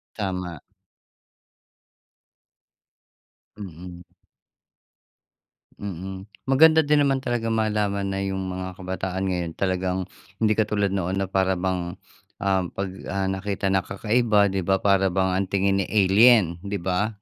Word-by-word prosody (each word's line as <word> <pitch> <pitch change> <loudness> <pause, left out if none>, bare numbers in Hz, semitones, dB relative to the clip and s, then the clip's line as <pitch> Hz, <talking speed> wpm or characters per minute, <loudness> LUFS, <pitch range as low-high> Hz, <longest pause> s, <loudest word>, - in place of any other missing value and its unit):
Tama. 90 -6 -4 3.0
Mm. 90 -2 -9 1.8
Mm. 95 +1 -6 0.2
Maganda 160 +4 +6
din 150 0 +3
naman 135 -1 +1
talagang 115 -2 -1
malaman 105 -2 0
na 95 - -2
yung 95 -1 -2
mga 95 0 -5
kabataan 95 0 -3
ngayon 90 -3 -2
talagang 95 -1 -1 0.3
hindi 110 -1 +2
katulad 105 -2 +1
noon 95 0 -1
na 95 - 0
para 95 -1 +1
bang, 90 -1 -2 0.4
ah, 95 -1 +1
'pag, 95 +1 -4 0.2
ah, 95 -1 -1
nakita 95 0 -2
na 95 -1 +3
kakaiba, 105 -1 +2
di 95 -1 -1
ba, 95 +2 +2
para 100 -1 +4
bang 95 0 +1
ang 95 0 0
tingin, 100 0 +1
eh, - - -3
alien, 100 -3 +5
di 100 0 -3
ba? 95 +4 -1
95 Hz, 125 wpm, -24 LUFS, 95-105 Hz, 3.0 s, Maganda